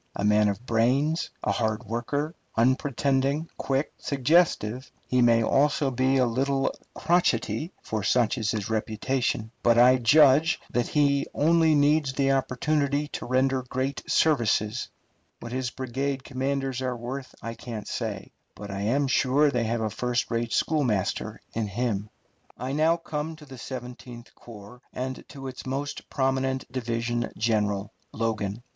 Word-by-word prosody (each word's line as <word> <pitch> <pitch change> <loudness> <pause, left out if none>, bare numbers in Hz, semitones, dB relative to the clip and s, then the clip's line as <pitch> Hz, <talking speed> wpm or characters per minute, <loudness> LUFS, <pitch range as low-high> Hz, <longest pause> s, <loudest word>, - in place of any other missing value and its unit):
A 100 - -1
man 105 0 +4
of 100 +4 -4
brains, 130 +8 +1
a - - +1
hard 110 0 -1
worker, 140 +8 -2 0.2
unpretending, 135 +4 +1
quick, 135 +2 -1
suggestive, 135 -4 +1 0.2
he 125 0 +2
may 115 -1 +5
also 140 +2 +2
be 130 +2 +2
a 130 - +4
little 135 +3 0 0.2
crotchety, 160 - +1
for 110 -1 -3
such 120 +3 +2
is 110 -2 -1
his 105 -3 -2
reputation; 110 +1 -1
but 120 -1 +4
I 125 +2 +7
judge 145 +5 +5
that 120 -1 0
he 140 -2 +2
only 160 0 +4
needs 145 -1 +3
the 135 0 +2
opportunity 140 +2 0
to - - -6
render 130 +1 +2
great 130 +2 -3
services. 120 -6 +2 0.5
What 120 - -8
his 130 0 -2
brigade 130 +2 -3
commanders 135 -1 -2
are 125 -2 -2
worth 130 +3 -6
I 115 - -4
can't 115 -2 -7
say, - - -4 0.2
but 100 -1 -8
I 100 0 -4
am 130 +8 +1
sure 140 +2 +3
they 120 -3 0
have 115 +1 -1
a 110 -1 -1
first 125 +3 -1
rate 115 0 -1
schoolmaster 125 - 0
in 110 -2 -1
him. 105 -1 -2 0.5
I 130 +2 -4
now 160 +4 +3
come 160 -1 -4
to 155 -1 -14
the 135 -3 -11
Seventeenth 125 -1 -8
Corps 115 +1 -13
and 130 +1 -4
to 135 -1 -8
its 130 0 -8
most 140 +2 -4
prominent 130 0 0
division 120 -1 -2
general, 105 -2 0 0.2
Logan. 110 -1 -2
130 Hz, 150 wpm, -26 LUFS, 115-140 Hz, 0.5 s, I